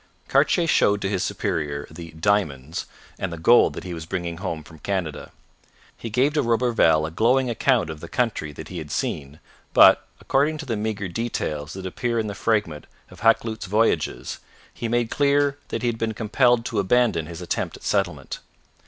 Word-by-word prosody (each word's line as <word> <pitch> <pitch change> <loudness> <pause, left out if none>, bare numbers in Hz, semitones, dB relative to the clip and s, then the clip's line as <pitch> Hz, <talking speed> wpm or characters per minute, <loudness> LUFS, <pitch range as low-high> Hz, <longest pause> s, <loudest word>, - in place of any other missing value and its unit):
Cartier 175 - +3
showed 105 -10 +3
to 95 - 0
his 95 -3 -1
superior 70 -1 -2
the 85 +1 -9
'diamonds' 80 -5 -1 0.3
and 95 - -2
the 85 - -5
gold 115 +10 +5
that - - -7
he 90 -1 -6
was 80 -1 -7
bringing 85 -1 -3
home 85 -4 -4
from 80 +1 -15
Canada. 85 -5 -3 0.6
He 115 - -7
gave 130 +6 +2
to 150 - +2
Roberval 115 - +3
a 80 - -5
glowing 125 +7 +2
account 115 - +1
of 80 - -8
the 85 - -8
country 115 - -1
that 75 +2 -9
he 90 - -5
had 75 -2 -8
seen, 70 +1 -3 0.4
but, - - +7
according 150 +3 +1
to 155 - -7
the 120 -4 -2
meagre 105 -2 -2
details 80 -8 -3
that 95 0 -7
appear 115 +5 -2
in 110 - 0
the 105 - -4
fragment 100 -8 -1 0.2
in - - -13
Hakluyt's 115 -2 +1
Voyages, 110 +4 0 0.3
he 120 - -4
made 120 0 0
clear 145 0 +2
that 115 - -4
he - - +1
had 115 -1 -4
been 110 -1 -1
compelled 120 +2 +2
to 110 - -1
abandon 100 -5 +2
his 85 0 -8
attempt 90 - -3
at - - -19
settlement. - - -1
105 Hz, 190 wpm, -24 LUFS, 80-120 Hz, 0.6 s, but